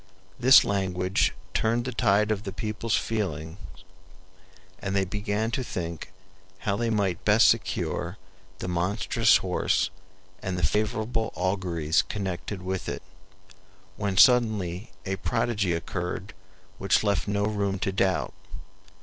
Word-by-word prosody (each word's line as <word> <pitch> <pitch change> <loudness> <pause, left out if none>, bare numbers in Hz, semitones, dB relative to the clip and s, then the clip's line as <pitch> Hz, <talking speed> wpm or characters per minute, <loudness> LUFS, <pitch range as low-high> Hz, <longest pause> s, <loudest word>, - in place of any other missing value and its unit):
This 130 +2 +8
language 95 -1 +1 0.2
turned 115 +2 +1
the 130 - -2
tide 105 -3 +2
of 105 -2 -1
the 100 - -5
people's 110 +2 -2
feelings 85 -6 -3 1.2
and 95 0 -3
they 95 -1 +2
began 105 +3 -2
to 130 - -1
think 85 - -5 0.5
how 100 - 0
they 115 +2 -1
might 100 -6 0
best - - +6
secure 85 +3 -1 0.4
the - - -5
monstrous 100 +6 +2
horse 90 0 +1 0.5
and 95 -1 -3
the 90 - +2
favorable 110 +1 -1
auguries 90 -4 +1
connected 95 -1 -5
with 95 0 -3
it, - - -5 0.9
when 100 -2 -2
suddenly 110 -6 +4 0.2
a 95 0 -2
prodigy 115 -3 0
occurred 90 +3 -4 0.5
which 95 +2 +2
left 100 -1 0
no 100 0 0
room 100 -2 -1
to 95 +1 -1
doubt. 95 -1 0
100 Hz, 125 wpm, -27 LUFS, 90-110 Hz, 1.2 s, This